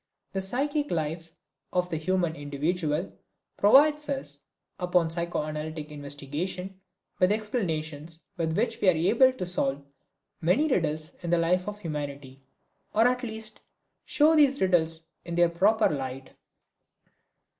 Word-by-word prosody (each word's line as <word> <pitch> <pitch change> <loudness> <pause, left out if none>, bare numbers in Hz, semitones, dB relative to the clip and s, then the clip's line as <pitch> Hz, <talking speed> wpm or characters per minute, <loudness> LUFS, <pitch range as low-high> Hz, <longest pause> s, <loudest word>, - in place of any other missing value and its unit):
The 195 - -1
psychic 285 +9 0
life 165 0 -3 0.4
of 180 0 0
the 160 - 0
human 175 0 0
individual 150 +3 -2 0.4
provides 295 +7 +5
us, 270 - -3 0.4
upon 180 -2 +1
psychoanalytic 155 -2 -3
investigation, 150 +7 -5 0.4
with 185 +1 +4
explanations 165 - -3 0.2
with 160 -2 -1
which 230 +4 0
we 190 - +5
are 180 - +4
able 235 +10 +5
to 225 -8 -5
solve 140 -5 -2 0.6
many 185 - +3
riddles 155 - 0
in 175 - -4
the 175 - +3
life 180 +3 +1
of 210 0 -4
humanity, 145 -6 -6 0.5
or 225 +3 +6
at 250 0 0
least 220 -3 -6 0.4
show 310 +2 +4
these 280 -3 +4
riddles 165 -3 +1 0.2
in 170 - -5
their 175 0 +4
proper 210 +6 +3
light. 135 -2 -4
175 Hz, 130 wpm, -27 LUFS, 155-210 Hz, 0.6 s, or